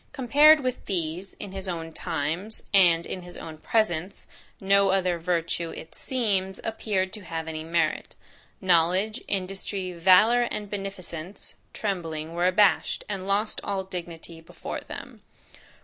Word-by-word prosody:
Compared 295 +3 +6
with 255 -1 -3
these, 175 +1 -3
in 200 - -7
his 190 0 -5
own 165 -2 -5
times, 165 +7 -3
and 175 -4 +5
in 185 - -5
his 175 0 -11
own 160 -1 -8
presence, 190 -5 0 0.3
no 200 0 +4
other 185 -2 +1
virtue, 170 -1 -1
it 160 - -9
seems, 200 -7 -1
appeared 205 -4 -1
to 215 - -6
have 165 -3 -5
any 155 -1 -4
merit. 160 -1 -1 0.4
Knowledge, 185 +5 +2
industry, 190 -1 -3
valour, 210 +8 +5
and 210 -1 -5
beneficence, 195 -3 -6 0.2
trembling, 165 -6 -3
were 175 +1 +2
abashed, 195 +1 +3
and 195 -2 -4
lost 205 +2 +1
all 195 -1 -2
dignity 170 -3 -7
before 165 - -6
them." - - -10
185 Hz, 135 wpm, -26 LUFS, 170-200 Hz, 0.4 s, Compared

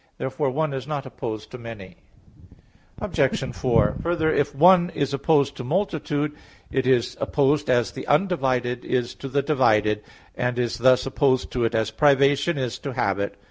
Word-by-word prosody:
Therefore 130 0 -2
"one" 150 +2 -1
is 135 0 -5
not 145 -3 -4
opposed 110 -4 -6
to 125 - -8
"many." 105 -6 -10 1.0
Obj. - - -1
4: 115 -4 +2
Further, 165 -2 0
if 145 0 0
"one" 175 +3 +6
is 140 -1 -1
opposed 140 0 +2
to 130 - -5
"multitude," 150 -2 -1 0.4
it 130 -1 0
is 125 -3 +2
opposed 145 +1 +1
as 120 -4 +2
the - - -8
undivided 130 -8 0
is 125 -2 -1
to 135 - -8
the 140 +1 0
divided; 110 -8 +2 0.3
and 125 0 -2
is 120 -1 -2
thus 130 +1 +4
opposed 135 -1 +1
to 120 -2 0
it 115 - -1
as 110 -1 0
privation 140 +4 +3
is 125 -4 -3
to 140 - -5
habit. 100 -4 -1
130 Hz, 165 wpm, -23 LUFS, 120-145 Hz, 1.0 s, one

